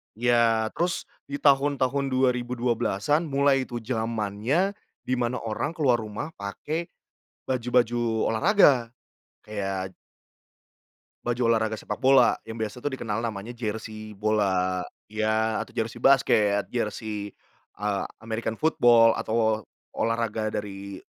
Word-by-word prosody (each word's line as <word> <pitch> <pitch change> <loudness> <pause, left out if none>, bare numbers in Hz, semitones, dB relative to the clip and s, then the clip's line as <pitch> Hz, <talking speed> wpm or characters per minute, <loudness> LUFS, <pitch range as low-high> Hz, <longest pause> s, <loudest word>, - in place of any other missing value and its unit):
Ya 115 -1 +2
terus 175 0 0 0.2
di 140 - -4
tahun-tahun 140 -1 +2
2012-an 125 - 0
mulai 140 -1 +2
itu 120 -1 -6
jamannya 115 - 0 0.3
di 130 - -2
mana 120 0 -1
orang 115 +8 -3
keluar 130 -8 +3
rumah 110 +9 -5
pakai 150 +12 -4 0.6
baju-baju 120 -1 +1 0.3
olahraga 135 - +4 0.5
kayak 95 -3 -3 1.3
baju 120 0 0
olahraga 110 -1 0
sepak - - -5
bola, 130 -1 +6
yang 110 0 -7
biasanya 110 +3 -4
tu 145 - -1
dikenal 115 -5 -3
namanya 110 +1 -4
jersey 110 -1 -5
bola 95 -3 +1 0.2
ya 110 +1 0
atau - - -11
jersey 115 +1 -3
basket, 105 -7 +4
jersey, 105 -3 -3 0.5
eee, 105 -1 -1 0.2
American 110 0 -3
football 120 -7 +5
atau 110 -1 0 0.3
olahraga 115 -1 -1
dari 100 -1 -6
115 Hz, 110 wpm, -26 LUFS, 110-130 Hz, 1.3 s, bola